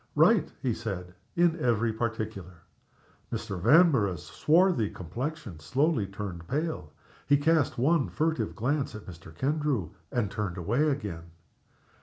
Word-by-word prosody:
"Right," -, -, +4 dB
he 125 Hz, -3 st, +1 dB
said, 95 Hz, -6 st, -5 dB, 0.2 s
"in 170 Hz, -1 st, +3 dB
every 115 Hz, -2 st, +1 dB
particular." 110 Hz, -6 st, -4 dB, 0.7 s
Mr. 90 Hz, -3 st, -4 dB
Vanborough's 115 Hz, -, +4 dB
swarthy 165 Hz, -, +3 dB
complexion 115 Hz, -, -5 dB
slowly 135 Hz, -, +1 dB
turned 95 Hz, -4 st, -6 dB
pale. 135 Hz, -, -2 dB, 0.4 s
He 145 Hz, -, +5 dB
cast 155 Hz, -1 st, +2 dB
one 145 Hz, +4 st, +2 dB
furtive 160 Hz, +1 st, -1 dB
glance 130 Hz, 0 st, -1 dB
at 110 Hz, -, -9 dB
Mr. 85 Hz, -2 st, -11 dB
Kendrew, 135 Hz, -, -1 dB, 0.2 s
and 120 Hz, -7 st, 0 dB
turned 100 Hz, -4 st, -3 dB
away 120 Hz, -, +1 dB
again. 100 Hz, -, -3 dB
115 Hz, 125 wpm, -28 LUFS, 95-150 Hz, 0.7 s, He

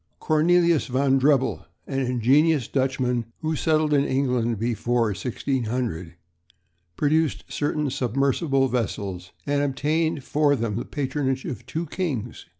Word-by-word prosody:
Cornelius 170 Hz, +1 st, +3 dB
van 135 Hz, +1 st, +2 dB
Drebbel, 135 Hz, -1 st, +2 dB, 0.2 s
an 135 Hz, -1 st, -2 dB
ingenious 130 Hz, +3 st, +2 dB
Dutchman 130 Hz, -3 st, 0 dB, 0.2 s
who 160 Hz, 0 st, -1 dB
settled 155 Hz, 0 st, +1 dB
in 140 Hz, -1 st, +4 dB
England 125 Hz, -4 st, 0 dB
before 115 Hz, +1 st, 0 dB
1600, 115 Hz, -, -3 dB, 0.8 s
produced 155 Hz, +1 st, +1 dB
certain 150 Hz, 0 st, -1 dB
submersible 135 Hz, -, +1 dB
vessels 100 Hz, -7 st, -3 dB
and 145 Hz, 0 st, +1 dB
obtained 145 Hz, +2 st, 0 dB
for 145 Hz, 0 st, +2 dB
them 115 Hz, -5 st, -2 dB
the 120 Hz, -, -3 dB
patronage 135 Hz, -2 st, -2 dB
of 120 Hz, -2 st, -6 dB
two 165 Hz, +5 st, -3 dB
kings. 145 Hz, -, -4 dB
135 Hz, 120 wpm, -24 LUFS, 120-150 Hz, 0.8 s, in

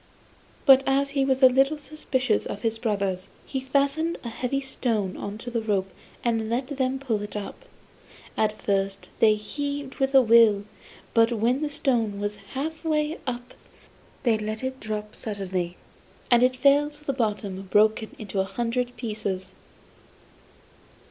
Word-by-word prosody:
But 270 Hz, -2 st, +8 dB
as 275 Hz, +1 st, +2 dB
he 275 Hz, -1 st, +1 dB
was 265 Hz, 0 st, +1 dB
a -, -, +12 dB
little 270 Hz, +4 st, +3 dB
suspicious 265 Hz, -6 st, -1 dB
of 200 Hz, -, -6 dB
his 225 Hz, -1 st, 0 dB
brothers, 200 Hz, -5 st, -1 dB, 0.2 s
he 265 Hz, -, -3 dB
fastened 280 Hz, +5 st, +1 dB
a 235 Hz, -, -4 dB
heavy 250 Hz, +4 st, -2 dB
stone 230 Hz, -8 st, -1 dB
on 200 Hz, +1 st, -5 dB
to 245 Hz, +2 st, -7 dB
the 235 Hz, -1 st, -1 dB
rope 195 Hz, -3 st, -1 dB, 0.3 s
and 225 Hz, -2 st, 0 dB
let 250 Hz, +3 st, -1 dB
them 260 Hz, 0 st, +1 dB
pull 240 Hz, -6 st, -1 dB
it 205 Hz, 0 st, -6 dB
up. 205 Hz, -1 st, -6 dB, 0.7 s
At 215 Hz, 0 st, 0 dB
first 195 Hz, -1 st, -1 dB
they 215 Hz, -1 st, +6 dB
heaved 285 Hz, +5 st, -4 dB
with 270 Hz, 0 st, +1 dB
a 265 Hz, -, +9 dB
will, 220 Hz, -3 st, +5 dB, 0.5 s
but 230 Hz, 0 st, +4 dB
when 235 Hz, +4 st, +1 dB
the 305 Hz, -, -1 dB
stone 235 Hz, -8 st, 0 dB
was 205 Hz, 0 st, -3 dB, 0.2 s
half 315 Hz, +5 st, -3 dB
way 310 Hz, 0 st, 0 dB
up 245 Hz, 0 st, -4 dB, 0.7 s
they 230 Hz, -4 st, +3 dB
let 215 Hz, +2 st, -4 dB
it 260 Hz, 0 st, -3 dB
drop 210 Hz, 0 st, -5 dB
suddenly, 185 Hz, -4 st, -3 dB, 0.5 s
and 240 Hz, -1 st, +6 dB
it 255 Hz, +1 st, +4 dB
fell 280 Hz, +3 st, +4 dB
to 300 Hz, 0 st, -13 dB
the 275 Hz, -, 0 dB
bottom 210 Hz, -6 st, -2 dB
broken 215 Hz, +2 st, +3 dB
into 200 Hz, -2 st, -4 dB
a -, -, +3 dB
hundred 240 Hz, +4 st, -2 dB
pieces. 210 Hz, -5 st, -4 dB
235 Hz, 160 wpm, -26 LUFS, 210-270 Hz, 0.7 s, a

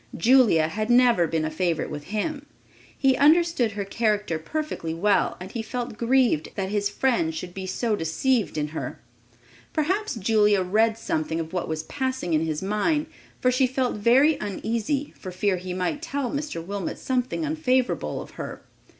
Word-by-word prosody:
Julia 225 Hz, -8 st, +5 dB
had 215 Hz, +7 st, -3 dB
never 240 Hz, -8 st, +5 dB
been 160 Hz, -1 st, -1 dB
a 155 Hz, -, -2 dB
favorite 170 Hz, 0 st, -1 dB
with 145 Hz, -1 st, -6 dB
him. 280 Hz, -, -3 dB, 0.5 s
He 270 Hz, -2 st, +3 dB
understood 310 Hz, -6 st, +4 dB
her 200 Hz, -1 st, -3 dB
character 210 Hz, -5 st, 0 dB
perfectly 165 Hz, -, -4 dB
well 200 Hz, +4 st, +2 dB
and 185 Hz, +2 st, -8 dB
he 230 Hz, -, -3 dB
felt 240 Hz, +1 st, -4 dB
grieved 235 Hz, -, +2 dB
that 190 Hz, -1 st, -2 dB
his 205 Hz, 0 st, 0 dB
friend 205 Hz, -8 st, 0 dB
should 175 Hz, +2 st, -6 dB
be 190 Hz, 0 st, -6 dB
so 220 Hz, +3 st, 0 dB
deceived 205 Hz, +5 st, 0 dB
in 150 Hz, 0 st, -1 dB
her. 160 Hz, -, -5 dB, 0.7 s
Perhaps 375 Hz, -, 0 dB
Julia 210 Hz, -2 st, +3 dB
read 220 Hz, +4 st, +2 dB
something 160 Hz, -6 st, -2 dB
of 160 Hz, +1 st, -5 dB
what 180 Hz, -, -2 dB
was 160 Hz, 0 st, -3 dB
passing 260 Hz, -6 st, -2 dB
in 155 Hz, 0 st, +3 dB
his 155 Hz, +1 st, -2 dB
mind; 295 Hz, +11 st, +1 dB, 0.3 s
for 255 Hz, -, +3 dB
she 255 Hz, +1 st, +3 dB
felt 255 Hz, 0 st, -1 dB
very 260 Hz, +9 st, +4 dB
uneasy 230 Hz, +7 st, -2 dB
for 185 Hz, -, -7 dB
fear 185 Hz, +1 st, 0 dB
he 180 Hz, +1 st, -6 dB
might 180 Hz, +9 st, -2 dB
tell 275 Hz, -3 st, -3 dB
Mr. 285 Hz, -, -4 dB
Wilmot 200 Hz, -1 st, -4 dB
something 255 Hz, +5 st, -1 dB
unfavorable 260 Hz, -5 st, 0 dB
of -, -, -15 dB
her. -, -, -7 dB
215 Hz, 170 wpm, -25 LUFS, 180-260 Hz, 0.7 s, Julia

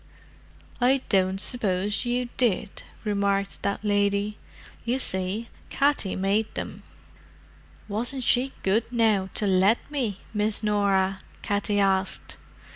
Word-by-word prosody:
"I 260 Hz, +2 st, +4 dB
don't 190 Hz, -1 st, +2 dB
suppose 205 Hz, -2 st, 0 dB
you 245 Hz, 0 st, -1 dB
did," 215 Hz, -4 st, 0 dB, 0.2 s
remarked 200 Hz, -2 st, 0 dB
that 200 Hz, +1 st, -2 dB
lady. 205 Hz, 0 st, +1 dB, 0.4 s
"You 240 Hz, +3 st, 0 dB
see, 195 Hz, -1 st, -2 dB, 0.2 s
Katty 280 Hz, -9 st, +1 dB
made 200 Hz, +3 st, 0 dB
them." -, -, -5 dB, 1.1 s
"Wasn't 240 Hz, +5 st, 0 dB
she 255 Hz, +3 st, +2 dB
good, 215 Hz, +5 st, +1 dB
now, 220 Hz, -5 st, +2 dB
to 210 Hz, -, +1 dB
let 195 Hz, +3 st, +4 dB
me, 240 Hz, -9 st, -2 dB
Miss 210 Hz, +1 st, +1 dB
Norah?" 195 Hz, -2 st, +2 dB, 0.2 s
Katty 205 Hz, 0 st, 0 dB
asked. 190 Hz, -1 st, +1 dB
205 Hz, 115 wpm, -26 LUFS, 195-230 Hz, 1.1 s, I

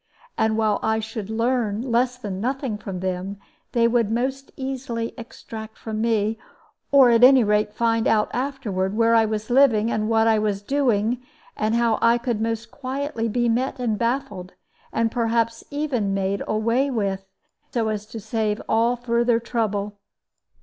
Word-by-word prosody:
And 220 Hz, 0 st, +1 dB
while 215 Hz, -2 st, +2 dB
I 220 Hz, 0 st, +1 dB
should 220 Hz, -2 st, -6 dB
learn 230 Hz, -1 st, 0 dB
less 250 Hz, 0 st, +1 dB
than 200 Hz, -6 st, -5 dB
nothing 260 Hz, -1 st, -2 dB
from 190 Hz, -3 st, -6 dB
them, 185 Hz, +2 st, -3 dB, 0.4 s
they 235 Hz, -1 st, +4 dB
would 235 Hz, -2 st, +2 dB
most 265 Hz, +4 st, -2 dB
easily 260 Hz, -3 st, -4 dB
extract 225 Hz, -2 st, -9 dB
from 220 Hz, -1 st, -4 dB
me, 220 Hz, -1 st, +1 dB, 0.5 s
or 270 Hz, -3 st, +7 dB
at 230 Hz, +1 st, +4 dB
any 260 Hz, -1 st, +8 dB
rate 210 Hz, 0 st, +1 dB
find 230 Hz, -1 st, +1 dB
out 215 Hz, -1 st, +3 dB
afterward, 220 Hz, -7 st, -2 dB
where 230 Hz, 0 st, +4 dB
I 225 Hz, -1 st, +5 dB
was 215 Hz, +1 st, -3 dB
living, 235 Hz, -4 st, +4 dB
and 215 Hz, 0 st, -1 dB
what 225 Hz, 0 st, +3 dB
I 220 Hz, -1 st, +4 dB
was 205 Hz, -2 st, -1 dB
doing, 245 Hz, -3 st, +1 dB, 0.3 s
and 215 Hz, +1 st, 0 dB
how 235 Hz, -2 st, +2 dB
I 230 Hz, +1 st, +5 dB
could 235 Hz, -2 st, -2 dB
most 225 Hz, 0 st, -2 dB
quietly 265 Hz, -3 st, -3 dB
be 240 Hz, +2 st, +1 dB
met 250 Hz, +4 st, 0 dB
and 240 Hz, -4 st, -1 dB
baffled, 230 Hz, -6 st, -2 dB, 0.4 s
and 225 Hz, 0 st, 0 dB
perhaps 230 Hz, -1 st, 0 dB
even 260 Hz, -9 st, -1 dB
made 195 Hz, 0 st, -1 dB
away 230 Hz, +6 st, +1 dB
with, 200 Hz, -6 st, -1 dB, 0.5 s
so 230 Hz, -3 st, 0 dB
as 210 Hz, -1 st, -4 dB
to 225 Hz, -, -7 dB
save 215 Hz, 0 st, -1 dB
all 230 Hz, +2 st, +2 dB
further 235 Hz, -1 st, +1 dB
trouble. 210 Hz, -3 st, -2 dB
230 Hz, 165 wpm, -23 LUFS, 215-245 Hz, 0.5 s, any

